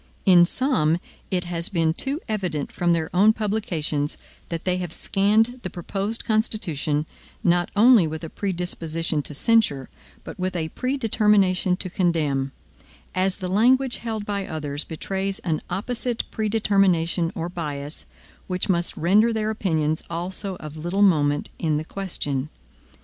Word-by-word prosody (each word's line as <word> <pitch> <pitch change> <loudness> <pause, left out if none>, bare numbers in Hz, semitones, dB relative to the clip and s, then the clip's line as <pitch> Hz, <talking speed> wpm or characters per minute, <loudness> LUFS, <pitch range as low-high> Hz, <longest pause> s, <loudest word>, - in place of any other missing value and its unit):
In 175 -2 +7
some, 170 - +2 0.3
it 180 -2 0
has 175 -1 -3
been 165 -3 +1
too 275 - -3
evident 180 - -2
from 175 -1 +1
their 160 -2 0
own 210 +4 +6
publications, 180 -9 -1 0.3
that 165 -1 -4
they 180 -1 +1
have 180 -3 -4
scanned 220 +8 +2
the 185 - -4
proposed 195 +6 -2
Constitution, 170 - 0 0.4
not 175 0 +3
only 220 -4 +6
with 160 +1 -5
a 165 - -5
predisposition 165 -4 -2
to 145 +1 -5
censure, 145 - +2 0.3
but - - -9
with 185 0 -2
a 160 -2 -2
predetermination 210 - +2
to 185 - -3
condemn; 155 -7 0 0.6
as 185 +1 +1
the 185 - -5
language 245 +6 +3
held 220 -3 -4
by 200 -1 -2
others 150 -2 -2
betrays 195 +4 -3
an 160 -3 -1
opposite 230 +5 -2
predetermination 195 -6 +2
or 165 0 -2
bias, 150 -4 -5 0.4
which 185 +1 -2
must 175 -2 +1
render 210 +7 +4
their 220 -1 -1
opinions 160 -7 0
also 185 +3 -4
of 155 -2 -9
little 175 +6 0
moment 145 -6 +3
in 155 -3 +1
the 155 - -3
question. 150 -8 -3
180 Hz, 145 wpm, -24 LUFS, 160-210 Hz, 0.6 s, In